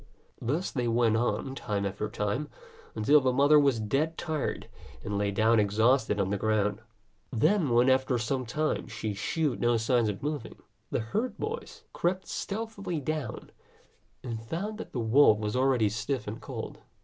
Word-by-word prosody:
Thus 150 Hz, +10 st, -1 dB
they 125 Hz, -3 st, -1 dB
went 115 Hz, -1 st, +3 dB
on 120 Hz, +3 st, 0 dB
time 105 Hz, -6 st, -2 dB
after 100 Hz, +2 st, -3 dB
time, 105 Hz, +9 st, -2 dB, 0.5 s
until 140 Hz, +8 st, +5 dB
the 130 Hz, -1 st, +2 dB
mother 145 Hz, +4 st, +5 dB
was 140 Hz, -5 st, +3 dB
dead 140 Hz, +10 st, 0 dB
tired, 155 Hz, -4 st, -3 dB, 0.4 s
and 105 Hz, -, -3 dB
lay 100 Hz, 0 st, +1 dB
down 110 Hz, +3 st, +3 dB
exhausted 110 Hz, +2 st, +2 dB
on 95 Hz, -1 st, 0 dB
the 100 Hz, -, -1 dB
ground. 105 Hz, 0 st, +1 dB, 0.5 s
Then, 155 Hz, -, +2 dB
when 120 Hz, +1 st, +4 dB
after 130 Hz, -1 st, +3 dB
some 125 Hz, +2 st, -2 dB
time 155 Hz, +5 st, -1 dB
she 110 Hz, -3 st, -4 dB
shewed 150 Hz, -, -1 dB
no 120 Hz, 0 st, +3 dB
signs 115 Hz, 0 st, +2 dB
of 100 Hz, +3 st, -5 dB
moving, 150 Hz, 0 st, -3 dB, 0.3 s
the -, -, -1 dB
herd 215 Hz, -, -2 dB
boys 465 Hz, +2 st, -5 dB
crept 185 Hz, +2 st, -1 dB
stealthily 200 Hz, -5 st, -4 dB
down, 145 Hz, -4 st, -4 dB, 0.7 s
and 115 Hz, -3 st, -4 dB
found 200 Hz, -, -4 dB
that -, -, -7 dB
the 125 Hz, -, -3 dB
wolf 115 Hz, 0 st, +5 dB
was 105 Hz, +1 st, -3 dB
already 130 Hz, -4 st, +3 dB
stiff 115 Hz, +3 st, -2 dB
and 105 Hz, +2 st, -6 dB
cold. -, -, -6 dB
125 Hz, 165 wpm, -29 LUFS, 110-150 Hz, 0.7 s, until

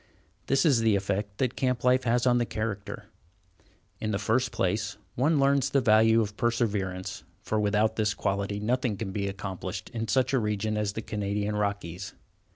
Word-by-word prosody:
This 135 Hz, +5 st, +3 dB
is 140 Hz, -7 st, +5 dB
the 110 Hz, -2 st, +3 dB
effect 100 Hz, +1 st, -2 dB
that 130 Hz, -2 st, 0 dB
camp 125 Hz, -2 st, 0 dB
life 125 Hz, +1 st, +3 dB
has 120 Hz, +1 st, +2 dB
on 120 Hz, -1 st, +4 dB
the 120 Hz, -, +1 dB
character. 105 Hz, -2 st, -4 dB, 0.9 s
In 110 Hz, -, -2 dB
the 105 Hz, -, 0 dB
first 115 Hz, +4 st, +1 dB
place, 105 Hz, +3 st, -1 dB, 0.2 s
one 145 Hz, +4 st, +2 dB
learns 140 Hz, 0 st, +3 dB
the 140 Hz, -, +3 dB
value 110 Hz, -1 st, +5 dB
of 105 Hz, -1 st, -3 dB
perseverance, 105 Hz, -6 st, -1 dB, 0.2 s
for 110 Hz, -, 0 dB
without 105 Hz, +1 st, +1 dB
this 105 Hz, -1 st, +1 dB
quality 100 Hz, +1 st, -1 dB
nothing 120 Hz, 0 st, 0 dB
can 95 Hz, -2 st, -4 dB
be 100 Hz, 0 st, -2 dB
accomplished 95 Hz, -1 st, -5 dB
in 115 Hz, -1 st, -3 dB
such 130 Hz, +5 st, +1 dB
a 135 Hz, -, +4 dB
region 105 Hz, 0 st, -1 dB
as 105 Hz, -1 st, -1 dB
the 110 Hz, -, -5 dB
Canadian 105 Hz, -1 st, -2 dB
Rockies. 100 Hz, -3 st, -3 dB
110 Hz, 175 wpm, -28 LUFS, 100-120 Hz, 0.9 s, is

